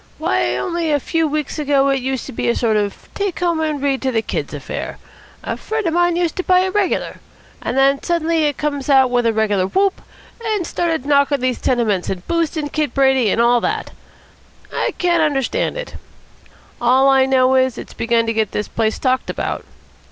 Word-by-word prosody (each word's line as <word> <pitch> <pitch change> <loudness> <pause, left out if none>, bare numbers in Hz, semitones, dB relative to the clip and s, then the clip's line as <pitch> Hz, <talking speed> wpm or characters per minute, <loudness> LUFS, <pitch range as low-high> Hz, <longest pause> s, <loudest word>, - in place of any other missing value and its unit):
Why, 125 0 0
only 335 - -2
a 290 - +2
few 325 +3 0
weeks 300 0 -3
ago 280 -2 +2
it 270 -1 +1
used 260 -1 -3
to - - -7
be 225 - -2
a 235 - +2
sort 225 -3 +1
of 205 -1 -2
take 400 -3 -2
home 340 -2 +1
and 310 -2 -1
read 275 -1 0
to 265 - 0
the 225 -2 0
kids - - -3
affair. - - -6 0.5
A - - -3
friend 440 -1 -3
of 330 - 0
mine 350 0 +2
used 345 -2 0
to 370 - -1
buy 365 0 +4
it 375 0 -1
regular. 410 -3 0 0.4
And - - -3
then 275 +1 +3
suddenly 330 -2 +1
it 290 -2 -1
comes 290 -2 -3
out 265 -2 +5
with 245 -1 +2
a - - +3
regular 210 -4 +1
whoop, 390 - +1 0.4
and 430 -5 -1
started 325 -6 -1
knocking 280 0 +3
these 255 -1 -1
tenements 220 -7 0
and 185 -1 -5
boosting 325 -3 -1
Kid 305 0 -2
Brady, 265 -4 +3
and 225 - 0
all 240 0 +4
that. 435 +1 -2 0.8
I - - -1
can't 345 -2 +2
understand 300 - 0
it. - - -6 0.9
All 255 +3 +4
I 265 -1 +4
know 260 -1 +3
is 260 -1 +2
that - - -6
it's - - -12
begun 230 0 +1
to 225 - -1
get 220 -2 -1
this 210 - -2
place 220 -1 -1
talked 260 -1 0
about. - - -3
275 Hz, 205 wpm, -19 LUFS, 240-330 Hz, 0.9 s, out